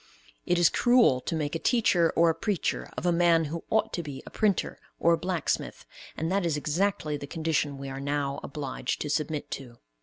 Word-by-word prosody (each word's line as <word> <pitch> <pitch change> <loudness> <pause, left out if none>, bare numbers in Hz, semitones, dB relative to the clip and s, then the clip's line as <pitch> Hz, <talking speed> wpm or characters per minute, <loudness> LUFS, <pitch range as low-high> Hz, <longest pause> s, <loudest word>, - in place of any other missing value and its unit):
It 175 - +3
is 175 -1 +5
cruel 240 - +4
to 165 - -3
make 150 -2 -2
a 165 - -1
teacher 180 -9 +3
or 165 0 +5
a - - -2
preacher 200 +1 -2
of - - -4
a 175 - +4
man 170 -1 +4
who 165 +3 -5
ought 220 - +1
to 175 - -1
be 145 -4 -8
a - - -10
printer 205 -4 0 0.2
or 170 - +4
a - - +2
blacksmith, 180 -2 -2 0.3
and 160 +3 -2
that 195 0 +1
is 165 -3 0
exactly 155 0 0
the 140 - -8
condition 155 -3 -1
we 140 0 -7
are 135 0 -6
now 140 0 -1
obliged 140 -3 -4
to 150 - -2
submit 155 0 -2
to. 125 -4 -7
160 Hz, 210 wpm, -28 LUFS, 145-175 Hz, 0.3 s, is